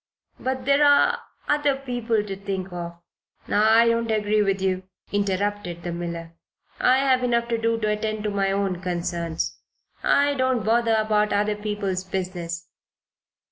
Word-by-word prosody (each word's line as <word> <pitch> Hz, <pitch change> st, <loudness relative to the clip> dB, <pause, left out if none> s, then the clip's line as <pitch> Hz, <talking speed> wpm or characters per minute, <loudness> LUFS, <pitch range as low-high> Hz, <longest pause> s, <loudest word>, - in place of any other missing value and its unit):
"But 260 Hz, 0 st, -3 dB
there 280 Hz, +2 st, +4 dB
are 285 Hz, -1 st, +5 dB, 0.3 s
other 295 Hz, -2 st, +2 dB
people 245 Hz, -5 st, -1 dB
to 195 Hz, -2 st, -5 dB
think 190 Hz, -2 st, -5 dB
of 170 Hz, -1 st, -6 dB, 0.4 s
" -, -, -32 dB, 0.3 s
"I 235 Hz, -, +4 dB
don't 230 Hz, 0 st, +1 dB
agree 215 Hz, -1 st, +2 dB
with 195 Hz, -1 st, +1 dB
you," 190 Hz, -1 st, 0 dB, 0.3 s
interrupted 200 Hz, -3 st, -1 dB
the 175 Hz, -, -3 dB
miller. 170 Hz, -1 st, -5 dB, 0.5 s
"I 255 Hz, +1 st, +4 dB
have 265 Hz, -2 st, +3 dB
enough 235 Hz, -1 st, +1 dB
to 230 Hz, -1 st, 0 dB
do 230 Hz, 0 st, +1 dB
to 215 Hz, -, 0 dB
attend 215 Hz, 0 st, -2 dB
to 210 Hz, -, -1 dB
my 195 Hz, -1 st, +1 dB
own 195 Hz, -2 st, -1 dB
concerns. 170 Hz, -2 st, -3 dB, 0.4 s
I 285 Hz, 0 st, +3 dB
don't 260 Hz, -5 st, 0 dB
bother 230 Hz, 0 st, +3 dB
about 215 Hz, -1 st, +2 dB
other 210 Hz, +1 st, +1 dB
people's 205 Hz, -3 st, -2 dB
business." 180 Hz, -3 st, -4 dB
210 Hz, 155 wpm, -24 LUFS, 185-235 Hz, 0.5 s, are